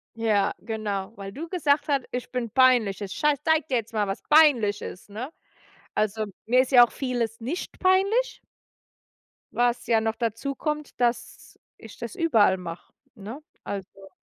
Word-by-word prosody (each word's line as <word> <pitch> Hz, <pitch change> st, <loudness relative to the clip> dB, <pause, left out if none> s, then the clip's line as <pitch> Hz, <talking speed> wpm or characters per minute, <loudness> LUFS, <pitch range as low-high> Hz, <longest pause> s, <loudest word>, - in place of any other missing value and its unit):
Ja, 215 Hz, -3 st, +1 dB
genau, 215 Hz, -3 st, -4 dB
„weil 195 Hz, -2 st, -8 dB
du 310 Hz, +11 st, -7 dB
gesagt 300 Hz, -4 st, +1 dB
hat, 280 Hz, -3 st, +1 dB
ich 250 Hz, 0 st, -5 dB
bin 250 Hz, -2 st, -2 dB
peinlich.“ 245 Hz, -5 st, +3 dB
„Ich 195 Hz, -2 st, -5 dB
schei 300 Hz, -1 st, +2 dB
zeig 320 Hz, -3 st, +2 dB
dir 260 Hz, -, -1 dB
jetzt 230 Hz, 0 st, -5 dB
mal, 210 Hz, -2 st, 0 dB
was 195 Hz, -, -4 dB
peinlich 255 Hz, -10 st, +4 dB
ist“, 185 Hz, -, -9 dB
ne? 235 Hz, +8 st, -6 dB, 0.6 s
Also 215 Hz, +1 st, 0 dB, 0.2 s
mir 250 Hz, +3 st, +4 dB
ist 260 Hz, -, -6 dB
ja 245 Hz, -2 st, +9 dB
auch -, -, -19 dB
vieles 240 Hz, -4 st, -3 dB
nicht 270 Hz, +10 st, -5 dB
peinlich. 395 Hz, +7 st, +2 dB, 1.1 s
Was 240 Hz, 0 st, 0 dB
ja 230 Hz, -2 st, +4 dB
noch 225 Hz, 0 st, -1 dB
dazukommt, 275 Hz, +6 st, -3 dB
dass 240 Hz, 0 st, -2 dB, 0.2 s
ich 225 Hz, -2 st, -13 dB
das 235 Hz, -2 st, -7 dB
überall 225 Hz, -, +3 dB
mache, 175 Hz, -2 st, -9 dB, 0.2 s
ne? 220 Hz, +7 st, -8 dB, 0.2 s
Also 195 Hz, 0 st, -7 dB
235 Hz, 160 wpm, -25 LUFS, 210-285 Hz, 1.1 s, ja